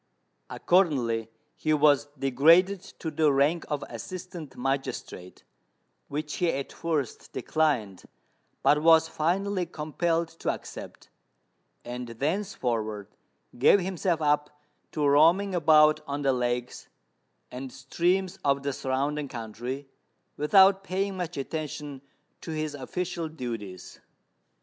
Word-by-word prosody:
Accordingly, 125 Hz, -, +1 dB, 0.3 s
he 155 Hz, -, 0 dB
was 145 Hz, -1 st, +4 dB
degraded 165 Hz, +9 st, +4 dB, 0.2 s
to 160 Hz, -, -4 dB
the 155 Hz, -1 st, +3 dB
rank 145 Hz, +5 st, +2 dB
of 145 Hz, -1 st, -2 dB
Assistant 180 Hz, -5 st, -8 dB
Magistrate, 135 Hz, -8 st, -4 dB, 0.6 s
which 150 Hz, +1 st, -4 dB
he 175 Hz, -, +1 dB
at 140 Hz, 0 st, -4 dB
first 155 Hz, -6 st, -3 dB
declined, 130 Hz, -, -1 dB, 0.6 s
but 150 Hz, 0 st, +4 dB
was 160 Hz, 0 st, +6 dB
finally 185 Hz, +4 st, -1 dB
compelled 165 Hz, +2 st, -1 dB
to -, -, -2 dB
accept; -, -, -9 dB, 0.8 s
and 125 Hz, 0 st, -5 dB
thenceforward 120 Hz, -, -2 dB, 0.5 s
gave 170 Hz, +10 st, +6 dB
himself 180 Hz, -3 st, -1 dB
up 150 Hz, 0 st, +2 dB, 0.4 s
to 150 Hz, -2 st, +1 dB
roaming 165 Hz, +8 st, +4 dB
about 155 Hz, -2 st, +5 dB
on 140 Hz, +1 st, -3 dB
the 135 Hz, -1 st, +3 dB
lakes 125 Hz, 0 st, -2 dB, 0.6 s
and 130 Hz, +1 st, -7 dB
streams 180 Hz, +8 st, -1 dB
of 140 Hz, -1 st, +1 dB
the 140 Hz, 0 st, -1 dB
surrounding 140 Hz, +3 st, -2 dB
country, 120 Hz, +3 st, -6 dB, 0.5 s
without 190 Hz, +5 st, +5 dB
paying 195 Hz, +1 st, -2 dB
much 180 Hz, -3 st, -4 dB
attention 145 Hz, -1 st, -5 dB, 0.4 s
to -, -, -9 dB
his 155 Hz, -1 st, -3 dB
official 170 Hz, +4 st, -4 dB
duties. 115 Hz, -, -7 dB
150 Hz, 110 wpm, -27 LUFS, 135-170 Hz, 0.8 s, was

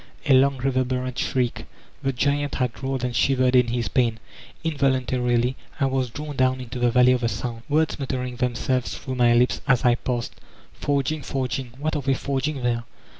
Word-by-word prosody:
A 145 Hz, -, +4 dB
long 135 Hz, +1 st, +4 dB
reverberant 130 Hz, -1 st, -1 dB
shridcl 125 Hz, -2 st, -1 dB, 0.4 s
The 135 Hz, -, 0 dB
giant 145 Hz, +2 st, 0 dB
had 125 Hz, -2 st, -2 dB
rolled 135 Hz, -1 st, -2 dB
and 125 Hz, -1 st, -2 dB
shivered 130 Hz, +2 st, +3 dB
in 125 Hz, -1 st, +5 dB
his 120 Hz, -2 st, -1 dB
pain. 115 Hz, 0 st, +1 dB, 0.5 s
Invol 140 Hz, -4 st, +2 dB
untarily 125 Hz, -1 st, 0 dB, 0.3 s
I 140 Hz, -, +3 dB
was 130 Hz, -2 st, 0 dB
drawn 145 Hz, +4 st, -6 dB
down 130 Hz, 0 st, +2 dB
into 125 Hz, 0 st, -6 dB
the 120 Hz, 0 st, +3 dB
Valley 125 Hz, +1 st, +5 dB
of 125 Hz, -1 st, +1 dB
the 115 Hz, -, +1 dB
Sound, 115 Hz, -1 st, -4 dB
words 155 Hz, +1 st, +1 dB
muttering 125 Hz, -2 st, -3 dB
themselves 125 Hz, 0 st, -1 dB
through 130 Hz, -, -5 dB
my 120 Hz, -2 st, +4 dB
lips 125 Hz, +1 st, +2 dB
as 130 Hz, -3 st, +3 dB
I 120 Hz, -, +6 dB
passed: 120 Hz, -1 st, -3 dB, 0.4 s
"Forging, 145 Hz, +1 st, -1 dB
forging— 130 Hz, -2 st, -3 dB
what 155 Hz, +3 st, -2 dB
arc 145 Hz, -3 st, -3 dB
they 135 Hz, -, +3 dB
forg 135 Hz, +2 st, -1 dB
ing 145 Hz, -4 st, -4 dB
there? 120 Hz, -1 st, 0 dB
130 Hz, 190 wpm, -24 LUFS, 125-135 Hz, 0.5 s, I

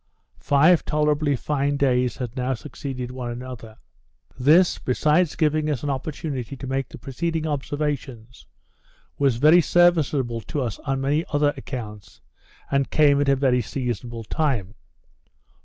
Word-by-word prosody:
Five 155 Hz, +5 st, +4 dB
tolerably 150 Hz, -1 st, +1 dB
fine 145 Hz, +2 st, -1 dB
days 125 Hz, -3 st, +1 dB
had 125 Hz, -2 st, -5 dB
now 130 Hz, 0 st, -1 dB
succeeded 130 Hz, -1 st, -6 dB
one 125 Hz, -1 st, -5 dB
another. 120 Hz, -2 st, -8 dB, 0.6 s
This, 155 Hz, +8 st, +4 dB
besides 150 Hz, +6 st, +1 dB
giving 155 Hz, -1 st, +1 dB
us 145 Hz, -4 st, -2 dB
an 145 Hz, -, -1 dB
opportunity 140 Hz, -2 st, -4 dB
to 135 Hz, -, -8 dB
make 135 Hz, +1 st, -2 dB
the -, -, -10 dB
preceding 160 Hz, +4 st, -3 dB
observations, 140 Hz, -5 st, -4 dB, 0.7 s
was 135 Hz, -4 st, +3 dB
very 155 Hz, +8 st, +6 dB
serviceable 150 Hz, -9 st, +2 dB
to 145 Hz, -, -4 dB
us 115 Hz, -4 st, -4 dB
on 135 Hz, -2 st, -2 dB
many 145 Hz, +4 st, +1 dB
other 145 Hz, -1 st, +2 dB
accounts, 105 Hz, -, -8 dB, 0.5 s
and 140 Hz, -1 st, +1 dB
came 145 Hz, -2 st, +4 dB
at 140 Hz, -, +1 dB
a 135 Hz, -, +5 dB
very 130 Hz, -2 st, +2 dB
seasonable 120 Hz, -1 st, -4 dB
time. 115 Hz, -6 st, -1 dB
140 Hz, 140 wpm, -23 LUFS, 125-150 Hz, 0.7 s, very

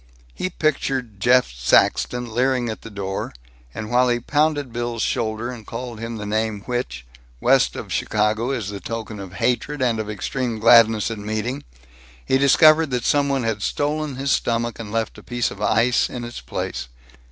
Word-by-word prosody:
He 185 Hz, -, -3 dB
pictured 135 Hz, -, -1 dB
Jeff 125 Hz, -, +4 dB
Saxton 115 Hz, -, +2 dB
leering 125 Hz, 0 st, +1 dB
at 110 Hz, -, -5 dB
the 115 Hz, -, -9 dB
door, 100 Hz, -2 st, -4 dB, 0.4 s
and 105 Hz, -, -6 dB
while 125 Hz, +1 st, +4 dB
he 120 Hz, 0 st, +1 dB
pounded 145 Hz, -1 st, 0 dB
Bill's 120 Hz, -1 st, -2 dB
shoulder, 110 Hz, +2 st, -1 dB
and 120 Hz, -3 st, -9 dB
called 115 Hz, 0 st, -6 dB
him 115 Hz, 0 st, -5 dB
the 105 Hz, -, -6 dB
name 110 Hz, 0 st, -1 dB
which, 120 Hz, -, -4 dB, 0.3 s
west -, -, +3 dB
of -, -, -6 dB
Chicago, 110 Hz, +3 st, 0 dB
is 115 Hz, -7 st, -2 dB
the 100 Hz, -1 st, -6 dB
token 110 Hz, -1 st, -6 dB
of 95 Hz, -2 st, -8 dB
hatred 125 Hz, +9 st, -1 dB
and 120 Hz, -3 st, +1 dB
of 110 Hz, -1 st, -4 dB
extreme 120 Hz, +2 st, -3 dB
gladness 115 Hz, -1 st, +5 dB
at 110 Hz, -, -5 dB
meeting, 110 Hz, +6 st, -3 dB, 0.6 s
he 130 Hz, -, +2 dB
discovered 155 Hz, +3 st, +6 dB
that 125 Hz, -2 st, -2 dB
some 145 Hz, -1 st, +2 dB
one 135 Hz, -2 st, 0 dB
had 110 Hz, -2 st, -1 dB
stolen 150 Hz, +3 st, -1 dB
his 135 Hz, +1 st, -1 dB
stomach 115 Hz, 0 st, 0 dB
and 110 Hz, -2 st, -7 dB
left 115 Hz, -1 st, -2 dB
a -, -, -13 dB
piece 120 Hz, -1 st, -1 dB
of 100 Hz, -, -10 dB
ice 115 Hz, +3 st, +2 dB
in 125 Hz, -, -6 dB
its 120 Hz, -10 st, -7 dB
place. 60 Hz, 0 st, -4 dB
115 Hz, 180 wpm, -22 LUFS, 110-130 Hz, 0.6 s, discovered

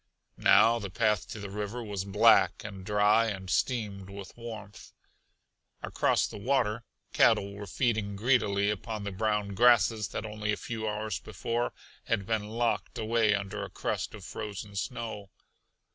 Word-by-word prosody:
Now 115 Hz, +1 st, +6 dB
the 100 Hz, -3 st, -5 dB
path 105 Hz, 0 st, +1 dB
to 110 Hz, -, -6 dB
the 100 Hz, -1 st, -7 dB
river 105 Hz, +4 st, -4 dB
was 100 Hz, -3 st, -4 dB
black 100 Hz, +1 st, +4 dB
and 95 Hz, -1 st, -8 dB
dry 105 Hz, +3 st, +3 dB
and 95 Hz, -3 st, -4 dB
steamed 105 Hz, -6 st, -1 dB
with 100 Hz, -1 st, -9 dB
warmth. 110 Hz, -4 st, -9 dB, 0.9 s
Across -, -, +1 dB
the -, -, -7 dB
water 120 Hz, -1 st, +1 dB, 0.3 s
cattle 100 Hz, 0 st, +4 dB
were 100 Hz, 0 st, -8 dB
feeding 110 Hz, -1 st, 0 dB
greedily 105 Hz, -3 st, +2 dB
upon 105 Hz, +1 st, -5 dB
the 100 Hz, -, -4 dB
brown 105 Hz, +1 st, 0 dB
grasses 110 Hz, -1 st, +4 dB
that 105 Hz, -, -5 dB
only 105 Hz, -1 st, -3 dB
a 105 Hz, -, -1 dB
few 110 Hz, -2 st, -4 dB
hours 105 Hz, -2 st, -3 dB
before 120 Hz, +1 st, -2 dB, 0.3 s
had 105 Hz, -4 st, 0 dB
been 105 Hz, -1 st, -1 dB
locked 115 Hz, +1 st, -1 dB
away 110 Hz, -1 st, +2 dB
under 100 Hz, +1 st, -4 dB
a -, -, -6 dB
crust -, -, -3 dB
of -, -, -11 dB
frozen 100 Hz, -1 st, -6 dB
snow. 110 Hz, -1 st, -4 dB
105 Hz, 155 wpm, -29 LUFS, 100-115 Hz, 0.9 s, Now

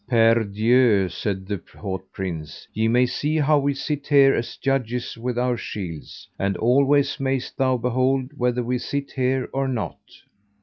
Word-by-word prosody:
Per 115 Hz, -1 st, +4 dB
dieu, 110 Hz, 0 st, +3 dB
said 95 Hz, +1 st, -3 dB
the 100 Hz, -2 st, -4 dB, 0.2 s
haut 95 Hz, -2 st, -4 dB
prince, 85 Hz, -6 st, -6 dB
ye 110 Hz, +1 st, +1 dB
may 125 Hz, +2 st, +4 dB
see 150 Hz, +5 st, -1 dB
how 150 Hz, 0 st, +3 dB
we 140 Hz, 0 st, 0 dB
sit 145 Hz, 0 st, -4 dB
here 140 Hz, -2 st, +6 dB
as 115 Hz, -, -3 dB
judges 125 Hz, -3 st, -1 dB
with 120 Hz, +1 st, -4 dB
our 125 Hz, 0 st, +1 dB
shields, 85 Hz, -10 st, -7 dB
and 100 Hz, -1 st, 0 dB
always 140 Hz, +4 st, +3 dB
mayest 135 Hz, -1 st, -2 dB
thou 130 Hz, -2 st, +2 dB
behold 130 Hz, +2 st, 0 dB
whether 125 Hz, -2 st, 0 dB
we 125 Hz, +1 st, -1 dB
sit 140 Hz, +2 st, -4 dB
here 130 Hz, 0 st, 0 dB
or 135 Hz, 0 st, 0 dB
not. 125 Hz, -5 st, -3 dB
125 Hz, 165 wpm, -23 LUFS, 110-135 Hz, 0.2 s, here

